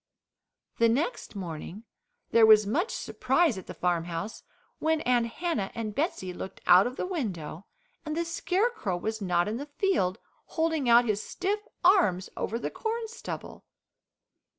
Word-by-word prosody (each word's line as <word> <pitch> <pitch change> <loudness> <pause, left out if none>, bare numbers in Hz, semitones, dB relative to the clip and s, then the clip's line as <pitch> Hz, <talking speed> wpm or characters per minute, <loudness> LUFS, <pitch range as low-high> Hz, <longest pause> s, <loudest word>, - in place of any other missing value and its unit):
The 230 0 +5
next 280 - -1
morning 180 +2 -6 0.5
there 225 -1 +6
was 215 -1 +7
much 330 - 0
surprise 270 +1 +1
at 185 - -13
the - - -8
farmhouse, 175 +2 -2 0.4
when 320 0 +1
Aunt 245 -3 +2
Hannah 235 - -2
and 220 -3 -3
Betsey 205 - -2
looked 190 - -7
out 185 +5 +7
of 250 - -6
the - - -2
window 195 - -4 0.4
and 305 0 -4
the 340 - 0
Scarecrow 360 - 0
was 220 +4 -3
not 175 -2 +1
in 215 +2 -2
the 285 +3 -6
field 290 - 0 0.3
holding 320 -5 0
out 235 +1 +7
his 210 -2 0
stiff 395 - -2 0.2
arms 340 - +4
over 230 - -2
the - - -4
corn 450 0 -3
stubble. 465 - -7
235 Hz, 150 wpm, -28 LUFS, -, 0.5 s, was